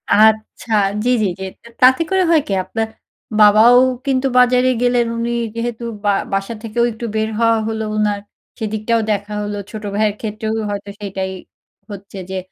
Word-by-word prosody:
আচ্ছা, 220 +2 +2 0.3
জ্বি, 245 - +1
জ্বি, 210 - +2
জ্বি 190 - -4 0.2
তে - - -15
তাতে 260 +5 +6
করে 380 -1 +2
হয় 315 - +5
কি, 200 - -1
আপনার 225 +3 -3 0.5
বাবাও 215 +4 +7 0.3
কিন্তু 270 -1 +1
বাজারে 250 +1 +4
গেলেন। 245 -1 +2
উনি 235 +1 -1 0.2
যেহেতু 235 0 -4 0.2
বা 205 - +4 0.2
বাসা 195 +3 -1
থেকেও 230 +1 0
একটু 225 +1 -7
বের 220 0 0
হওয়া 230 -1 +4
হলো 220 0 -2
ওনার, 210 -1 +1 0.4
সেদিকটাও 220 +1 -1
দেখা 205 0 -2
হল। 205 - -4 0.2
ছোট 215 -1 -7
ভাইয়ের 210 -1 +1
ক্ষেত্রেও 220 0 -3 0.2
হয়তো 205 0 -5
সেটাই 190 -2 -4 0.6
হচ্ছে 200 -1 -9
যে, 190 - -3
220 Hz, 165 wpm, -18 LUFS, 205-235 Hz, 0.6 s, বাবাও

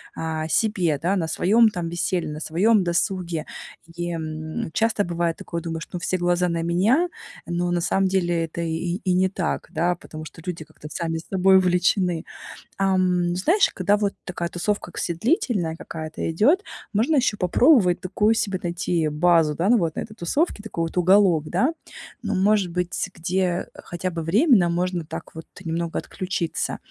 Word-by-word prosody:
а, 160 -1 -3
себе, 180 -4 +1
да, 180 +4 +1
на 170 -4 -1
своем 220 +7 +4
там 175 -5 -4
веселье, 175 0 -1
на 150 - -6
своем 195 +7 +2
досуге. 175 -2 -1 0.5
И, 175 0 -3
м, 155 -1 -4
часто 225 -2 +1
бывает 170 -1 -1
такое, 170 -1 -5
думаешь: 165 0 -5
"Ну 180 - -3
все 185 +2 -1
глаза 175 0 +1
на 165 -1 -1
меня". 205 - +3 0.4
Но 175 +1 -1
на 175 - +1
самом 190 +2 +2
деле 175 -3 +1
это 165 +1 -6
и 170 +1 -2
и 185 - +1
не 185 +1 +3
так, 185 -3 -3
да, 175 +1 +1
потому 155 -2 -10
что 165 - -12
люди 175 -3 -4
как-то 150 - -12
сами 165 -2 -2
собой 190 +2 +3
увлечены. 180 -1 +2 0.5
Ам, 185 -2 +2
знаешь, 335 - +3
когда 200 +3 +2
вот 205 -1 0
такая 175 -1 -4
тусовка 205 +5 -2
к - - -7
се 170 - -1
длительная 200 - 0
какая-то 160 -1 -5
идет, 290 - +3 0.3
можно 230 +10 +2
еще 250 -6 +2
попробовать 200 - +4
такую 210 +4 +1
себе 195 -4 -1
найти 175 -2 -1
базу, 155 0 +3
да, 175 +6 0
на 240 - +6
вот 165 -6 -1
этой 220 - -5
тусовке, 215 - -1
такой 205 -6 -4
вот 165 +2 -5
уголок, 180 -3 +4
да. 280 +6 +1 0.5
Ну, 210 -3 -2
может 195 -1 +2
быть, 180 0 -2 0.2
где 180 +1 -1
хотя 180 +1 -5
бы 165 -1 -4
временно 195 - +4
можно 175 0 -1
так - - -8
вот 160 - -9 0.2
немного 165 0 -2
отключиться. 180 -3 -3
175 Hz, 170 wpm, -23 LUFS, 165-195 Hz, 0.5 s, на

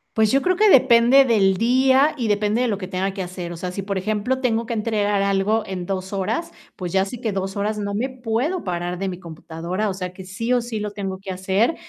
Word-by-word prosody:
Pues, 220 -1 +3
yo 275 +1 +3
creo 370 0 +2
que 425 +2 +4
depende 260 -1 +6
del 195 -6 +3
día 260 +5 +4
y 235 -5 -2
depende 210 +3 +1
de 250 - +1
lo 200 - -1
que 185 -2 -6
tenga 190 +1 -2
que 195 - -5
hacer. 180 -1 -6
O 170 - -7
sea, 180 +1 -5
si 195 - -3
por 195 0 -3
ejemplo 215 +6 -1
tengo 230 -3 0
que 235 - -7
entregar 210 -2 0
algo 200 +3 +1
en 185 -2 -5
2 190 +1 -4
horas, 330 - -2 0.2
pues, 180 -1 -5
ya 190 0 +3
sí 225 +4 -6
que 220 -5 -2
2 195 +1 -3
horas, 210 +1 -1
no 200 0 -3
me 235 +6 -1
puedo 255 +7 -2
parar 175 -1 -3
de 195 0 -2
mi 180 0 -6
computadora. 170 +4 -4
O 190 - -2
sea, 180 -1 -5
que 190 - -10
sí 230 +6 -2
o 245 - +3
sí 230 -2 -5
lo 210 -1 -4
tengo 195 -2 -5
que 195 -1 -7
hacer 190 - +1
205 Hz, 250 wpm, -22 LUFS, 190-235 Hz, 0.2 s, depende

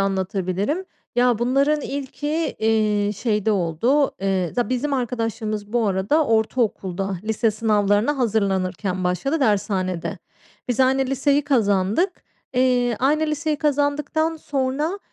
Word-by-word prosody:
anlatabilirim. 195 - -1 0.3
Ya, 245 -2 +3
bunların 275 +5 +2
ilki, 280 +1 -5 0.3
eee, 215 -2 +1
şeyde 210 0 0
oldu. 210 - +1
Eee, 190 -3 0
za 245 -1 0
bizim 255 +3 -1
arkadaşlığımız 225 -4 -2
bu 235 -2 +2
arada 200 +11 +1
ortaokulda, 200 -4 0
lise 220 +1 +1
sınavlarına 210 +4 +1
hazırlanırken 195 -4 0
başladı 275 - 0
dershanede. 195 -6 0 0.5
Biz 245 0 0
aynı 265 +1 +3
liseyi 275 +2 +2
kazandık. 215 - +1 0.3
Eee, 250 -2 +2
aynı 300 +4 +2
liseyi 305 0 -1
kazandıktan 295 +2 0
sonra 290 +5 -2
230 Hz, 110 wpm, -22 LUFS, 200-275 Hz, 0.5 s, Ya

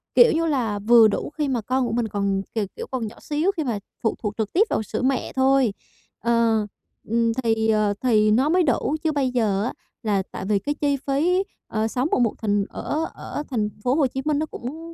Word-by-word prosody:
kiểu 480 0 +7
như 330 +1 +1
là, 240 -10 0
vừa 225 +2 +6
đủ 210 - -2
khi 300 -2 0
mà 255 -4 0
con 255 +3 0
của 225 - -3
mình 235 -1 0
còn, 200 -2 -1
k - - -32 0.2
kiểu, - - -6
còn 250 -4 -2
nhỏ 215 - -10
xíu 305 +6 0
khi 315 - 0
mà 235 -7 -2 0.2
phụ 225 - +1
thuộc 210 -1 -1
trực 220 -2 -2
tiếp 380 - +5
vào - - 0
sữa 220 - -4
mẹ 260 0 0
thôi. 265 -4 +3 0.5
Ờ, 230 -2 +2 0.4
ừm, 230 +1 +2
thì, 225 -1 +1
ờ, 215 -2 +2
thì 215 -4 +3
nó 260 +7 +3
mới 360 +2 +4
đủ. 285 +1 +1
Chứ 320 - +2
bây 275 -4 0
giờ 210 -5 +1
á, 240 - -2 0.3
là 205 -3 +1
tại 190 - -6
vì 205 0 +2
cái 290 +7 -3
chi 285 -1 0
phí, 310 +7 +1 0.2
ờ, 220 0 -1
sống 250 +4 -1
ở - - +2
một 235 -3 +2
thành 205 -2 0
ở 315 +2 -2
ở 295 - -6
thành 220 -6 0
phố 250 +1 +2
Hồ 290 -3 +3
Chí 265 +1 -4
Minh 300 -1 +1
nó 310 - 0
cũng 320 +5 -8
240 Hz, 235 wpm, -23 LUFS, 215-285 Hz, 0.5 s, kiểu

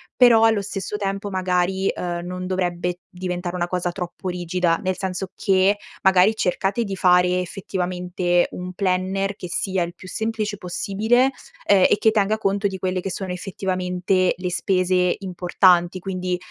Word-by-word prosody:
però 235 -3 +6
allo 225 -2 +4
stesso 195 +1 -4
tempo 200 0 -3
magari, 185 0 0
uhm, 175 -1 -3
non 180 +1 -5
dovrebbe 180 -1 -2
diventare 180 -1 -4
una 175 -1 0
cosa 180 0 -1
troppo 180 +1 -6
rigida. 175 -1 0
Nel 185 -1 -1
senso 190 0 -3
che, 195 +1 +2 0.3
magari 190 +3 +5
cercate 195 +3 0
di 200 -3 -4
fare 180 -1 +4
effettivamente 180 -1 -1
un 180 0 -6
planner 190 +1 -1
che 180 - -7
sia 185 +1 -1
il 170 0 -6
più 185 - -12
semplice 220 +1 -2
possibile, 215 +8 +1 0.3
ehm, 195 -2 +5
e - - +4
che 220 +1 +3
tenga 215 0 +1
conto 200 -1 0
di 190 -1 -5
quelle 185 0 -2
che 195 - -4
sono 190 0 -4
effettivamente 185 0 -1
le 180 0 -3
spese 180 0 +1
importanti, 180 -1 +2
quindi, 185 -1 -3
185 Hz, 155 wpm, -22 LUFS, 180-195 Hz, 0.3 s, però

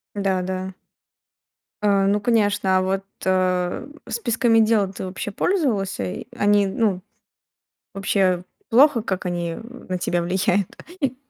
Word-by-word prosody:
Да, 195 -2 0
да. 185 +1 -4 1.1
А, 200 -2 +3
ну 205 +1 +2
конечно, 205 -4 +2
а - - +1
вот, 190 +1 -1 0.2
а, 185 +4 0 0.2
списками 235 0 +2
дел 215 -3 +3
ты 190 - -6
вообще 185 +2 -5
пользовался? 205 - 0
И 90 - -5
они, 205 -1 +3
ну, 195 -1 0 0.9
вообще 190 -2 +1 0.3
плохо 255 0 +5
как 190 -3 -3
они, 175 -1 -2
э, - - -8 0.3
на 185 - -1
тебя 175 0 0
влияют? 185 +2 +1 0.3
И 270 -5 0
195 Hz, 135 wpm, -22 LUFS, 185-215 Hz, 1.1 s, плохо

